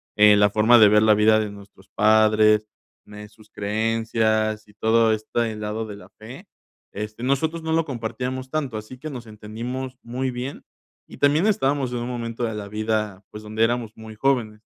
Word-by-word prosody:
eh, 105 0 +7
la 105 0 +4
forma 110 +3 +5
de 110 -2 +8
ver 105 0 +5
la 110 - +6
vida 110 +1 +4
de 105 -1 -2
nuestros 100 -1 -15
padres, 110 0 +4 0.4
mm, 105 - -16
eh, 105 0 -10
sus 110 0 -21
creencias, 110 0 -1
y 105 - -20
todo 110 +1 +3
este 110 +1 -2
lado 105 +1 -4
de 105 - -8
la 100 -1 -14
fe, 125 - -11 0.5
este, 105 +3 -6
nosotros 160 +5 0
no 160 0 -2
lo 165 0 +2
compartíamos 130 0 -5
tanto, 140 -7 -3
así 110 +4 -9
que 155 +4 -7
nos 125 -4 -8
entendimos 120 +5 -6
muy 125 +2 -3
bien, 125 +3 -6 0.4
y - - -13
también 145 +6 +3
estábamos 140 - +1
en 125 - -3
un 120 0 -4
momento 120 -1 -4
de 110 - -3
la 100 -1 -6
vida, 105 -2 -2
pues, 105 0 -10
donde 110 +1 -1
éramos 120 -2 -2
muy 110 -1 -10
jóvenes, 110 -4 0
110 Hz, 190 wpm, -23 LUFS, 105-125 Hz, 0.5 s, de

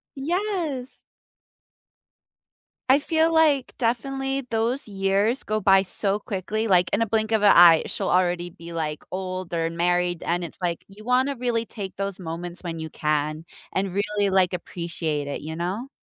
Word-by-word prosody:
Yes. 320 -4 -2 1.9
I 265 +2 +6
feel, 320 +2 +2
like, 300 -5 +3
definitely 270 +3 -1
those 230 +4 0
years 200 +4 +1
go 215 0 -1
by 195 0 +5
so 195 +1 -1
quickly, 210 +2 -3
like, 180 -3 +4
in 200 - +2
a - - 0
blink 220 +1 0
of 220 -2 +2
an 205 - +8
eye, 170 -2 +8
she'll - - -3
already 175 -1 +1
be, 170 -1 -11
like, 155 -2 -3
older 185 -3 -3
and 165 0 -4
married, 175 0 +1
and 175 +1 -1
it's, 170 - -8
like, 170 -2 -2
you 200 +2 -14
wanna 255 +4 +2
really 235 -2 -1
take 200 -4 -7
those 195 -1 -3
moments 175 +1 -6
when 165 -2 -4
you 160 0 -5
can, 155 +1 -1 0.3
and 190 -1 -1
really, 205 0 0
like, 190 -1 +3
appreciate 165 -4 -3
it, 145 - -4
you 160 +1 -6
know? 190 +10 -3
195 Hz, 165 wpm, -24 LUFS, 175-235 Hz, 1.9 s, an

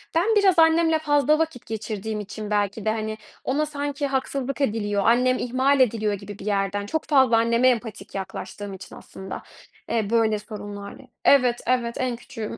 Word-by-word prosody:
Ben 420 +7 +3
biraz 385 -4 +4
annemle 325 0 +4
fazla 300 0 +3
vakit 320 -7 -2
geçirdiğim 215 -1 -4
için 210 +1 -6
belki 205 +1 0
de, 215 - +2
hani, 220 0 -3 0.3
ona 295 +4 0
sanki 285 -1 -3
haksızlık 270 0 -2
ediliyor, 205 -5 0
"Annem 250 +2 +4
ihmal 260 +3 +1
ediliyor." 215 -4 +2
gibi 200 0 -8
bir 195 - -9
yerden 200 0 -1
çok 315 +9 -2
fazla 265 -6 +4
anneme 235 +2 +3
empatik 230 -4 -3
yaklaştığım 195 +1 -6
için 190 0 -10
aslında, 190 0 -9 0.5
eee, 215 -3 0
böyle 225 -2 +2
sorunlarla 205 0 -8 0.2
Evet, 250 -3 +4
evet 240 -2 +1
en 255 -2 0
küçüğüm. 230 -3 -7
235 Hz, 160 wpm, -24 LUFS, 210-275 Hz, 0.5 s, biraz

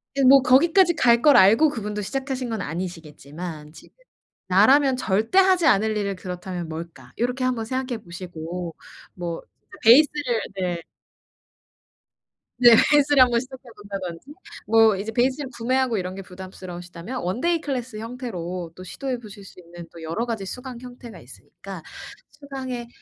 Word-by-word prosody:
예 275 - +1
뭐 270 +1 +7
거기까지 335 +7 +4
갈 235 -6 +4
걸 290 -3 +6
알고 225 +11 +6
그분도 210 -5 -4
시작하신 265 +2 -4
건 220 -3 -3
아니시겠지만 160 -2 -7
지금 160 - -17 0.5
'나라면 260 +9 +5
절대 220 - 0
하지 370 -3 +4
않을 215 0 +3
일을 200 -2 -2
그렇다면 180 -2 -6
뭘까.' 165 +1 -9
요렇게 250 +2 -1
1 255 -1 +1
번 225 -1 -4
생각해 255 -2 -3
보시고 175 -1 -7 0.4
뭐 170 -2 -5 0.4
베이스를 255 0 +5 0.2
네. 180 -3 -2 1.8
네. 240 -1 +8 0.2
베이스를 290 -2 +5
한번 240 -2 +5
시작해 260 +1 -10
본다든지 195 +3 -7 0.3
뭐 220 -1 +5
이제 210 +3 -5
베이스를 260 +4 0
구매하고 250 0 0
이런 185 0 -4
게 195 - -7
부담스러우시다면 180 +3 -8
원데이 315 - 0
클래스 255 -6 -4
형태로 185 -8 -6
또 185 - -10
시도해 255 +6 -5
보실 205 -3 -12
수 185 - -15
있는 170 -1 -12
또 165 - -11
여러 165 +9 -3
가지 225 -4 -4
수강 250 +2 -8
형태가 245 -2 -11
있으니까 - - -12 0.5
수강의 260 -4 -7
225 Hz, 340 characters per minute, -23 LUFS, 180-260 Hz, 1.8 s, 네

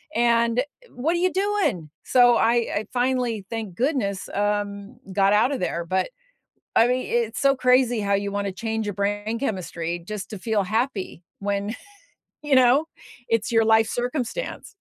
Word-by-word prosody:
and 235 +1 +3 0.3
what 295 +7 -1
are 345 - 0
you 365 +1 +2
doing? 385 - 0
So 245 -2 +5
I 230 +1 +3 0.2
I 210 - -1
finally, 245 -4 0
thank 220 -6 -5
goodness, 235 - -1
um, 205 +2 -2 0.2
got 195 0 +3
out 215 +6 +4
of 275 - -2
there, 170 -1 -2
but, 185 - 0 0.7
I 230 +2 +5
mean, 255 +1 0
it's 230 -2 -1
so 275 -1 +4
crazy 250 -2 +3
how 200 -1 +1
you 200 0 -1
wanna 200 -1 -2
change 220 +2 -3
your 205 - -3
brain 205 +3 -2
chemistry 175 -8 -3
just 195 +4 -7
to 210 - -6
feel 220 0 0
happy 215 - -2 0.2
when, 200 +2 -2 0.7
you 295 -2 +1
know, 260 +3 +5 0.5
it's 230 -2 +1
your 225 -1 +4
life 220 0 +4
circumstance. 250 - -3
225 Hz, 160 wpm, -24 LUFS, 200-250 Hz, 0.7 s, So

